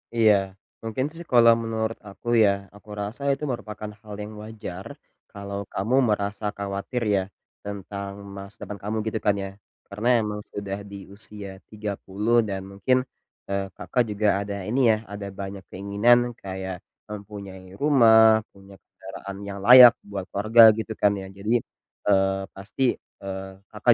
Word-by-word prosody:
Iya. 110 -2 +6 0.5
Mungkin 115 +4 -2
sih 170 +1 -3
kalau 115 -1 +7
menurut 110 0 -2
aku 100 +4 -13 0.2
ya, 100 -1 +1
aku 105 +1 -17
rasa 105 +7 -5
itu 140 +2 -2
merupakan 110 -4 -5
hal 105 -2 -10
yang 105 +1 -6
wajar 105 -4 -8 0.5
kalau 100 -1 -5
kamu 110 +7 0
merasa 100 0 -1
khawatir 100 +4 -4
ya 95 - +1 0.4
tentang 100 0 -6 0.2
masa 100 +1 -9
depan 105 - -5
kamu, 105 +2 -2
gitu 110 - -1
kan 100 -1 +3
ya. 95 - -4 0.4
Karena 105 +4 -4
emang 105 -1 -3 0.2
udah 100 0 -5
di 100 - -7 0.2
usia 105 -2 -5 0.2
30 105 +2 0
dan 95 -2 -4
mungkin, 100 +7 +2 0.5
eee, 100 0 -2
Kakak 125 - 0
juga 105 +1 0 0.2
ada 100 0 -5
ini 125 +5 0
ya, 110 - +2
ada 100 0 -6
banyak 95 -1 -6
keinginan, 100 +5 +3 0.3
kayak 95 -1 -5 0.2
mempunyai 100 -3 -9
rumah, 110 -6 +6
punya 100 0 -16
kendaraan 95 +1 -10
yang 100 0 -6
layak 125 0 +10
buat 100 -2 -6
keluarga 110 +4 +4
gitu 110 0 -5
kan 105 - +4
ya. 95 -1 -6
Jadi, 100 +4 -1 0.5
eee, 95 0 +2
pasti, 100 +7 -5 0.4
eee, 95 0 -5 0.2
Kakak 110 +3 +4
100 Hz, 150 wpm, -25 LUFS, 100-110 Hz, 0.5 s, layak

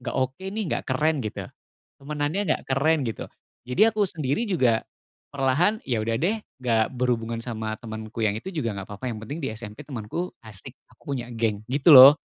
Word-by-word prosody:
nggak - - -4
oke, 130 +7 -2
nih, 215 +2 -3
nggak - - -1
keren, 150 +3 +1
gitu, 110 - -5 0.6
temanannya 145 +5 -2
nggak - - +1
keren." 150 +1 +2
Gitu, 115 - -4 0.4
jadi 215 - +4
aku 210 -1 +2
sendiri 155 - -1
juga 125 - +3 0.5
perlahan, 140 +10 +2
ya, 115 -5 0
udah, 115 +1 0
deh, 190 +9 +1 0.3
nggak 115 -3 +3
berhubungan 115 -2 -1
sama 110 -2 -4
temanku 110 -1 -6
yang 100 - +1
itu 185 - -7
juga 115 - -2
nggak 95 -1 -7
apa-apa 105 +5 -7
yang 110 - -6
penting 145 +7 -6
di - - -1
SMP 105 -1 -8
temanku 135 +7 -5
asik, 105 -4 -8 0.2
aku 140 - -6
punya 120 -2 -5
geng, 110 -3 -1
gitu, 140 +5 +4
loh, 135 +4 +11
130 Hz, 185 wpm, -25 LUFS, 110-150 Hz, 0.6 s, loh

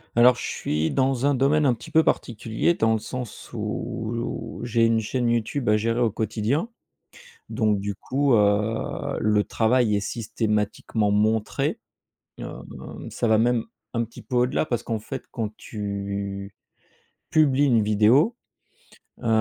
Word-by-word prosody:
Alors 125 +1 +7
je - - -5
suis 75 +2 -1
dans 135 0 +1
un 145 - +3
domaine 145 +3 +3
un 125 - +3
petit 115 - -12
peu 160 - +5
particulier, 115 +7 0
dans 110 -6 +2
le 110 - +1
sens 125 +1 -7
où 115 0 -4
j'ai 115 -1 +1
une 115 0 +3
chaîne 120 +2 -1
YouTube 120 +2 0
à 105 - +5
gérer 115 +2 0
au 120 -2 +3
quotidien. 110 - -1 0.8
Donc 110 -3 +1
du 100 0 -3
coup, 135 +5 0
heu, 105 +1 +1
le 105 -1 +2
travail 110 0 +2
est - - +1
systématiquement 105 -1 -1
montré, 105 +1 +1 0.6
heu, - - -4 0.6
ça 120 - -1
va 110 -1 +4
même 120 0 +2 0.3
un 115 0 +1
petit 115 - -12
peu 125 - -4
au-delà 125 +5 +2
parce 120 -4 -1
qu'en 115 -2 -2
fait 130 +5 -7
quand 110 -3 -4
tu 100 -1 -5 0.8
publies 145 -2 +4
une 120 -5 +4
vidéo, 110 - +4 0.9
heu, - - -4
115 Hz, 150 wpm, -24 LUFS, 105-125 Hz, 0.9 s, Alors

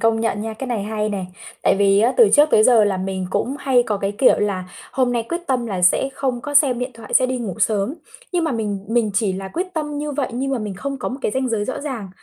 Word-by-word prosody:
công 225 0 +2
nhận 225 -2 -1
nha, 220 +1 -4
cái 265 +5 -6
này 235 -5 -2
hay 215 0 -2
nè, 200 -3 -3 0.4
tại - - +3
vì 200 0 +4
á, 235 +4 +3
từ 465 -3 +7
trước 300 +1 +5
tới 215 - +5
giờ 230 -4 +6
là 200 -2 0
mình 190 0 -3
cũng 270 +8 -1
hay 265 -3 +3
có 210 - 0
cái 195 0 -2
kiểu 250 +5 +4
là 200 -3 -1 0.3
hôm 255 -2 +1
nay 235 -1 0
quyết 340 - -1
tâm 250 -3 0
là 190 -5 -3
sẽ 180 +9 +4
không 260 -3 -2
có 290 +4 -6
xem 275 -4 +4
điện 250 +1 -3
thoại, 225 -2 -7
sẽ 255 - +5
đi 255 0 -2
ngủ 215 -7 -4
sớm, 215 +4 +1 0.4
nhưng 350 -2 +1
mà 320 - 0
mình 205 -4 -3
mình 225 -2 +1
chỉ 200 -2 +1
là 190 +1 -5
quyết 355 - -3
tâm 295 -2 -3
như 295 0 -3
vậy 280 -2 -1
nhưng 270 +3 -2
mà 265 - 0
mình 210 -3 -4
không 275 +8 -5
có - - -3
một 260 - -6
cái - - 0
ranh 260 0 -1
giới 220 -3 -1
rõ 260 - -4
ràng, 260 -9 -5
235 Hz, 285 wpm, -21 LUFS, 205-265 Hz, 0.4 s, từ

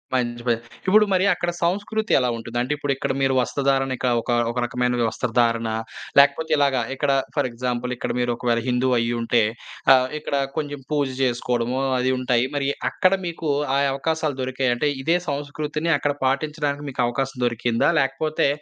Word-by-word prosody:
మంచి 120 -1 -1
పని 115 -1 +2 0.3
ఇప్పుడు 210 +3 +6
మరి 185 +1 +3
అక్కడ 175 0 -2
సంస్కృతి 205 +5 -1
ఎలా 125 -1 +1
ఉంటుంది? 115 +1 -6
అంటే 125 +4 -1
ఇప్పుడు 145 -1 -1
ఇక్కడ 135 - -2
మీరు 135 0 +2
వస్త్రధారణ 135 0 0
ఇక 130 - -1
ఒక 120 - -3 0.2
ఒక 120 - -8
రకమైన 125 0 0
వస్త్రధారణ 115 -1 0 0.5
లేకపోతే 140 +3 +4
ఇలాగ 140 -2 +3 0.2
ఇక్కడ 140 +1 0 0.2
ఫర్ - - +1
ఎగ్జాంపుల్ 125 +1 -3
ఇక్కడ - - -3
మీరు 120 0 +1
ఒకవేళ 120 -1 0
హిందువు 125 +1 +2
అయ్యి 115 +1 0
ఉంటే 115 0 +2 0.5
ఆహ్, 130 -1 +4
ఇక్కడ 150 - -3 0.2
కొంచెం 145 -2 -3
పూజ 145 -2 +1 0.2
జేసుకోవడము 125 0 0 0.2
అది 130 +1 +1
ఉంటాయి. 125 -1 +2
మరి 140 -1 0 0.2
అక్కడ 185 +1 +3
మీకు 165 -2 -4 0.3
ఆ - - +3 0.2
అవకాశాలు 155 0 -1
దొరికాయా? 130 0 0
అంటే 150 +4 +1
ఇదే 165 +5 +3
సంస్కృతిని 150 +3 -2
అక్కడ 145 0 0
పాటించడానికి 145 +1 -1
మీకు 130 - -2
అవకాశం 135 +2 -3
దొరికిందా? 120 -1 +1
లేకపోతే 135 +4 0
135 Hz, 165 wpm, -23 LUFS, 120-145 Hz, 0.5 s, ఇప్పుడు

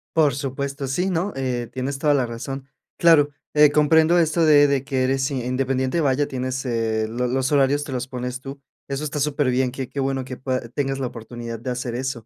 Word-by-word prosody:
Por 155 -4 +4
supuesto, 140 +1 -4
sí, 180 +8 0
¿no?, 185 +3 -1
eh, 125 -3 -2
tienes 135 +2 -3
toda 150 -1 +3
la 135 -3 +2
razón. 130 +3 -6 0.3
Claro, 160 -4 +6 0.2
eh, 150 -1 +6
comprendo 160 +3 +4
esto 165 0 +3
de 145 -2 +6
de 140 -2 +1
que 135 -2 -1
eres 135 +1 +1
independiente, 130 +3 -1
vaya, 140 0 +2
tienes, 130 0 -3
eh, 110 -2 0
lo 120 +3 -2
los 130 +3 0
horarios 145 0 +3
te 145 - -7
los 125 -1 -3
pones 125 0 -5
tú. 135 +1 -8 0.3
Eso 140 +2 -3
está 150 0 -3
superbién, 130 -3 +1
qué 130 0 -5
qué 140 - -5
bueno 135 -1 -1
que 130 -1 -7
pued 130 -3 -3
tengas 135 -1 -1
la 130 - -1
oportunidad, 115 -1 -7
de 125 - -5
hacer 125 -1 -3
eso. 125 -2 -4
135 Hz, 205 wpm, -23 LUFS, 125-145 Hz, 0.3 s, Claro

